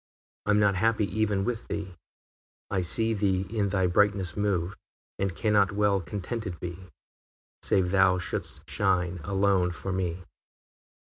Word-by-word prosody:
I - - -1
am 105 0 +4
not 100 -1 +4
happy 105 +2 +2
even 105 -3 +1
with 120 -2 -3
thee; 100 -2 -4 0.8
I 95 -2 +1
see 110 +6 +2
thee 95 -2 +1
in 100 -2 +1
thy 95 -1 +1
brightness 95 -1 +2
move, 100 -3 0 0.4
And 95 -3 -1
cannot 100 +2 +2
well 100 -1 +2
contented 100 +3 -5
be, 90 +1 -7 0.7
Save 90 -2 +2
thou 95 -1 +4
should'st 85 -5 -3
shine 90 -3 0
alone 95 -1 +2
for 90 +2 -5
me. 90 -1 -2
95 Hz, 140 wpm, -27 LUFS, 90-105 Hz, 0.8 s, am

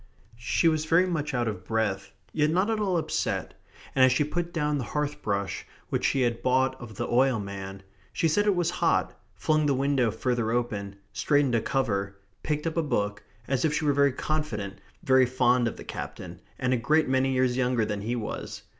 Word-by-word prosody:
She 120 +8 +1
was 155 -1 +2
very 165 +3 +4
much 160 -5 -2
out 120 -1 0
of 105 -4 -4
breath, 100 -2 -1 0.2
yet 150 -1 +2
not 185 +7 +2
at 220 - 0
all 190 -4 +1
upset, 165 - -2 0.4
and 130 - +4
as 130 - +6
she 130 +4 +3
put 170 +3 -3
down 150 -4 0
the - - -2
hearth 150 0 -2
brush 100 -1 -2 0.2
which - - -1
she 135 - +2
had 120 -1 0
bought 130 +1 +2
of 110 -3 -9
the 120 +4 -3
oil 130 -1 +3
man, 95 -1 -7 0.3
she 165 - +1
said 205 +7 +2
it 205 - +4
was 175 -1 +1
hot, - - +1 0.2
flung 155 -1 +1
the 140 - +2
window 135 -3 +2
further 120 +1 -1
open, 105 -4 -2 0.2
straightened 145 +1 +2
a 115 - +3
cover, 100 -7 -1 0.3
picked 150 0 -2
up 165 0 -2
a - - +4
book, 105 -9 -1 0.3
as 130 -2 0
if 150 -1 +2
she 155 - -1
were 145 - +3
very 140 0 +4
confident, 125 -9 -3 0.2
very 130 -4 +5
fond 125 -1 +3
of - - -4
the - - -8
Captain, 90 0 -7 0.2
and 130 -1 0
a - - +2
great 155 +7 +2
many 130 0 +2
years 130 -1 +2
younger 125 -3 +1
than 105 -1 -3
he 115 +4 -2
was. 110 -3 -5
130 Hz, 210 wpm, -27 LUFS, 110-150 Hz, 0.4 s, as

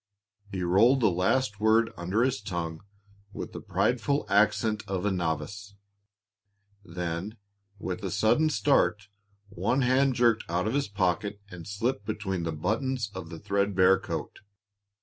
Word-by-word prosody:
He 95 -2 -3
rolled 110 +10 +4
the 110 - +4
last 105 +5 +1
word 110 +1 +3
under 95 +7 0
his 130 -5 0
tongue 85 -5 -4 0.5
with - - -6
the - - -7
prideful 140 +4 0
accent 105 +1 +3
of 95 0 -2
a 105 - +2
novice. 95 +4 -3 1.1
Then, 90 +3 -5 0.4
with 95 +2 -5
a 95 - -2
sudden 110 - +3
start, 120 -9 +2 0.4
one 105 +8 0
hand 130 +1 +3
jerked 120 -2 +3
out 90 +3 0
of 110 - -1
his 140 0 0
pocket 100 +1 -1
and 90 -2 -9
slipped 105 +2 -2
between 95 -3 -2
the 85 - -1
buttons 115 - -2
of 95 -4 -7
the 85 - -7
thread 100 +2 -1
bare 95 0 +5
coat. - - -5
100 Hz, 150 wpm, -28 LUFS, 90-115 Hz, 1.1 s, bare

